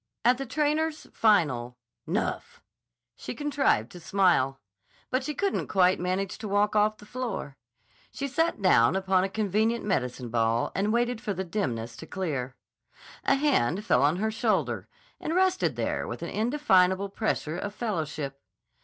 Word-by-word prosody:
At 250 +2 +4
the 270 - -4
trainer's 305 +3 0
final 140 - +2 0.3
"Nuff," - - -2 0.6
she - - -7
contrived 280 - +1
to 175 - -10
smile, 170 -8 +2 0.5
but 255 +1 +1
she 300 +2 -4
couldn't 395 +4 -1
quite 185 -1 +3
manage 185 +2 -2
to 220 - -5
walk 205 +1 +1
off 215 +1 +3
the 210 - -14
floor. 225 - -4 0.5
She 280 - -4
sat 325 -5 0
down 150 -5 +5
upon 190 -1 +2
a 195 - -1
convenient 215 +3 0
medicine 125 - -1
ball 115 0 +1
and 205 +2 0
waited 240 0 0
for 210 -5 -3
the 190 - -2
dimness 120 - -3
to 160 - -9
clear. 140 -9 -3 0.7
A 275 - +4
hand 210 - +1
fell - - +3
on 145 +4 +3
her 220 +4 -1
shoulder 220 0 0 0.3
and 320 - -2
rested 375 0 +2
there - - -2
with - - -6
an - - -4
indefinable 200 -6 +2
pressure 185 -5 -2
of 205 +1 -5
fellowship. 155 - -3
200 Hz, 155 wpm, -27 LUFS, 160-240 Hz, 0.7 s, down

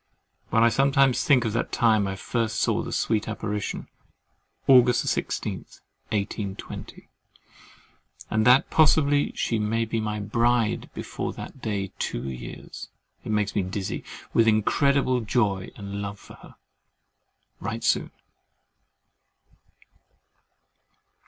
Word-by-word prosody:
When 115 - +3
I 115 - +6
sometimes 135 +2 +3
think 130 -5 +4
of 110 - -1
the 115 - +2
time 110 -4 +2
I 95 - -3
first 110 +3 -2
saw - - +1
the - - -6
sweet 110 -1 0
apparition, 105 -2 -4 0.8
August 125 -2 +5
16, - - -1 0.5
1820, 100 -2 -5 1.2
and 110 0 +2
that 130 +2 +5
possibly 145 -2 +4
she 115 - 0
may 115 +2 0
be 115 0 -2
my 105 -1 -2
bride 115 +2 +1
before - - -4
that 135 - -9
day 100 -4 -2
two - - -2
years, 60 -2 -8 0.3
it - - -4
makes 105 -1 0
me 105 - +2
dizzy 95 +1 -4 0.3
with 115 - +4
incredible 130 +4 +2
joy 100 -4 0
and 100 0 -6
love 100 0 -7
of - - -13
her. - - -15 1.0
Write - - -4
soon. - - +2
110 Hz, 120 wpm, -25 LUFS, 100-120 Hz, 1.2 s, I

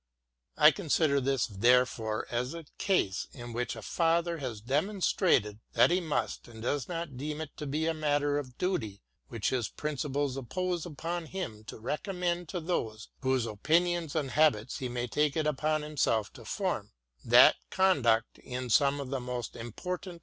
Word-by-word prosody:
I 150 0 +8
consider 155 -5 +1
this 135 -1 +1
therefore 115 0 +2
as 125 +5 -1
a 165 -2 -8
case 100 - +1
in 120 -3 -8
which 120 +1 -2
a - - -9
father 170 0 +1
has 125 -6 -4
demonstrated 145 - +1
that - - +5
he 180 +1 +2
must 160 -4 -2
and 115 -2 -12
does 140 +2 0
deem 150 -3 -4
it 160 -2 -6
to 150 - -5
be 150 +3 -1
a 165 - +1
matter 145 -2 +1
of 130 -3 -8
duty 115 - -2 0.2
which 115 -4 -1
his 120 -5 0
principles 145 -2 -2
impose 175 +6 -2
upon 165 +2 -4
him 130 - -5
to - - -8
recommend 175 - -2
to 180 - -3
those 115 -11 -3
whose 130 -3 +1
opinions 165 - +1
and 145 -4 -1
habits 140 -7 +2
he 130 - -3
may 120 0 -2
take 150 +3 +1
upon 155 0 0
himself 135 -8 0
to - - -12
form, - - -2 0.3
that - - +7
conduct 140 -13 +2
in 125 -1 -5
some 140 +3 +4
of 140 -2 -5
the 135 - -1
most 125 -1 -4
important 175 - -5
145 Hz, 165 wpm, -30 LUFS, 120-165 Hz, 0.3 s, I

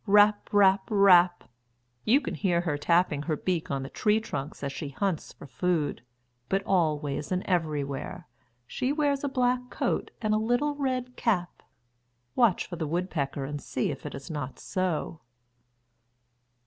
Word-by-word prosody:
Rap! 205 +1 +5
rap! 195 -1 +4
rap! 185 -4 +5 0.6
you 260 +7 +5
can - - -4
hear 175 -4 +1
her 165 -4 -1
tapping 160 0 +2
her 155 0 -2
beak 175 -1 -2
on 135 -1 -2
the 135 - -6
tree 215 0 +2
trunks 145 -10 -6
as 140 - -2
she 145 0 -5
hunts 185 +4 -2
for - - -13
food. 150 +3 -1 0.5
But 195 +1 +1
always 150 -5 0
and 185 0 0
everywhere, 150 -6 -2 0.4
she 255 - -2
wears 285 -2 +1
a 285 - 0
black 250 -1 0
coat - - -1
and 215 -2 0
a - - +3
little 245 +7 +1
red 255 -3 -2
cap. 180 -7 -1 0.7
Watch 235 -7 +3
for 175 - -7
the 160 -2 -2
woodpecker 150 -5 -2
and 145 +1 -5
see 125 - -2
if 140 - -8
it - - -7
is 140 +3 -8
not 145 -4 -5
so. 175 -3 -2
180 Hz, 160 wpm, -28 LUFS, 150-215 Hz, 0.7 s, Rap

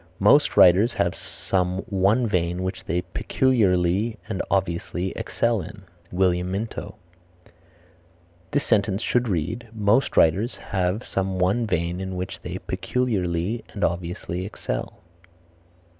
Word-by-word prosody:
"Most - - +4
writers 95 +7 +6
have - - 0
some 90 -1 -2
one 100 +6 +2
vein 90 -3 0
which 95 - -4
they 85 +2 0
peculiarly 100 0 +1
and 95 -5 -2
obviously 90 -1 -1
excel 115 -3 0
in." 100 +4 -10 0.3
William 90 -1 +1
Minto. 105 +4 -4 1.5
This 145 - 0
sentence 100 -2 +1
should 125 0 +1
read, 105 +7 -2
Most 110 +3 +1
writers 100 +10 +3
have 95 +4 -2
some 95 -1 -2
one 95 +6 +1
vein 90 -1 -1
in 95 -1 -4
which 90 +2 -5
they - - -5
peculiarly 105 -4 -1
and 100 - -4
obviously 85 +1 -2
excel. 85 - -5
95 Hz, 120 wpm, -24 LUFS, 90-110 Hz, 1.5 s, writers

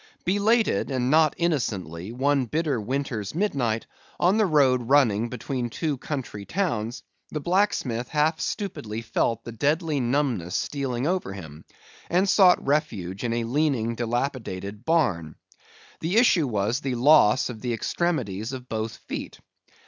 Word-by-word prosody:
Belated, 215 +5 +2
and 130 -1 0
not 155 -1 +4
innocently, 105 - -2
one 135 +2 +1
bitter 145 -1 -1
winter's 115 -2 -3
midnight, 130 - 0 0.3
on 185 +4 +3
the 215 -2 +3
road 130 -6 +3
running 120 -6 +3
between 125 0 -3
two 150 +5 -2
country 130 -9 -5
towns, 120 - -2 0.3
the 155 - -3
blacksmith 150 - 0
half 155 +1 +1
stupidly 115 - -4
felt 115 0 0
the 120 - -7
deadly 150 +5 0
numbness 120 - 0
stealing 135 -3 -2
over 175 - -1
him, 80 -5 -10 0.4
and 185 +3 +2
sought 185 -2 +5
refuge 110 - -1
in 120 - -1
a 115 0 0
leaning, 125 -2 0
dilapidated 115 -4 -3
barn. 110 - +1 0.6
The 175 +7 0
issue 185 - +4
was, 110 +2 0
the 135 -4 -2
loss 130 -2 +5
of 110 -3 -10
the 125 - -2
extremities 115 - -2
of 130 -1 -7
both 110 0 -3
feet. - - -6
130 Hz, 140 wpm, -25 LUFS, 110-155 Hz, 0.6 s, sought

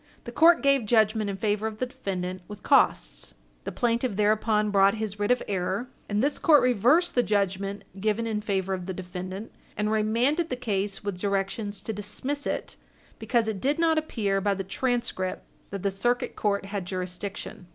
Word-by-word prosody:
The 240 - -7
court 330 +6 +5
gave 275 -5 +3
judgment 215 -1 +3
in 195 - -3
favor 210 +1 0
of 220 -1 -6
the 255 - -1
defendant 185 -6 -4
with 210 -1 -10
costs. 280 - +2 0.3
The - - -3
plaintiff 240 -2 0
thereupon 210 0 +2
brought 195 0 +5
his 215 -2 -4
writ 205 - 0
of 250 0 +2
error, 195 +5 -2 0.2
and 205 +2 +1
this 290 +1 0
court 300 -3 +6
reversed 250 - +3
the 245 - +4
judgment 200 -2 -1 0.2
given 215 +3 0
in 215 -2 -1
favor 195 -2 -1
of 180 -1 -4
the 190 - -4
defendant 185 +3 -6 0.3
and 210 0 0
remanded 235 +10 +1
the 255 - -1
case 205 -5 -2
with 195 -3 -4
directions 200 +1 -2
to 220 - -4
dismiss 235 +8 -3
it - - -3 0.4
because 235 -3 +1
it 210 -4 -3
did 285 +2 +1
not 325 -1 +3
appear 205 -10 -1
by 200 0 +1
the 195 - -3
transcript 195 -2 -2 0.2
that 195 -2 -6
the 200 - +1
Circuit 240 +6 0
Court 200 -1 0
had 200 -2 -4
jurisdiction. 185 +1 -5
210 Hz, 185 wpm, -27 LUFS, 195-240 Hz, 0.4 s, court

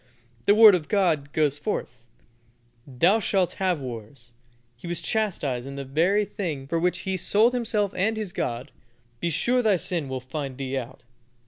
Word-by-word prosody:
the 205 - +6
Word 220 -1 +9
of 170 -4 0
God 165 -9 +1
goes 150 -2 +1
forth, 125 - -4 0.8
"Thou 170 - +3
shalt 190 -4 +1
have 180 -5 +1
wars." 120 0 -9 0.4
He 120 - -11
was 175 -1 -2
chastised 150 - -2
in 140 - -7
the 140 0 -5
very 175 +10 +2
thing 160 -10 -4
for 165 +4 -1
which 180 +2 0
he 190 -1 -2
sold 215 +7 +3
himself 215 -5 0
and 220 +4 0
his 210 -5 -4
God. 120 +1 -3 0.5
"Be 170 - -1
sure 245 +10 +1
thy 215 -4 +3
sin 170 -5 -3
will 130 0 -3
find 130 +1 -6
thee 135 -1 -4
out." 130 0 -6
165 Hz, 170 wpm, -25 LUFS, 135-200 Hz, 0.8 s, Word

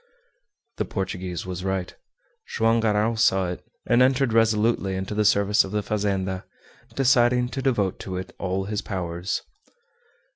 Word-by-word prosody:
The - - -1
Portuguese 95 -3 -4
was 90 -1 -5
right. 95 -1 -2 0.5
Joam 115 0 +2
Garral 110 +1 +1
saw 95 -4 +3
it, 90 - -7 0.2
and 120 +1 +3
entered 130 -1 +3
resolutely 110 -3 +2
into 95 +2 -4
the 105 0 +1
service 100 +1 +4
of 95 - -7
the 105 0 -1
fazenda, 95 -3 -1 0.5
deciding 125 -2 +3
to 135 - -4
devote 110 -8 0
to 95 -1 -5
it 95 0 -7
all 95 0 -1
his 105 0 -2
powers. 90 -1 -3
105 Hz, 145 wpm, -24 LUFS, 95-115 Hz, 0.5 s, service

